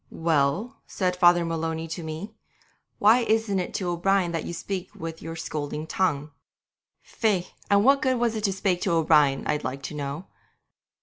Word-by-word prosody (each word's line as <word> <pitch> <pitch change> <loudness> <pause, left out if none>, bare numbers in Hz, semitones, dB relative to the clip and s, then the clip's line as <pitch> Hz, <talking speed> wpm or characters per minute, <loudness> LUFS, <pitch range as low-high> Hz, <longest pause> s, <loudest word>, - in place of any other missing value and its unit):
'"Well," 165 - 0
said 180 -2 -1
Father 175 -1 +5
Maloney 165 0 -3
to 165 +2 -5
me, 160 +5 -6 0.6
"why 220 +4 +5
isn't 220 -4 +1
it 180 - -3
to 180 -3 -1
O'Brien 180 +1 +1
that 165 -2 -3
you - - -4
speak 185 +1 -4
with 165 0 -7
your 165 0 -6
scolding 150 -2 -4
tongue?" 155 -4 -1 0.7
Faix! 200 -6 -1 0.2
and 200 +1 +4
what 275 +1 +5
good 260 -1 +2
was 235 -1 +1
it 215 0 -1
to 195 - +2
spake 190 -2 0
to 180 - 0
O'Brien, 150 -4 +3
I'd 150 0 -1
like 135 +2 -4
to - - -5
know? 145 +4 -5
175 Hz, 175 wpm, -25 LUFS, 160-200 Hz, 0.7 s, Father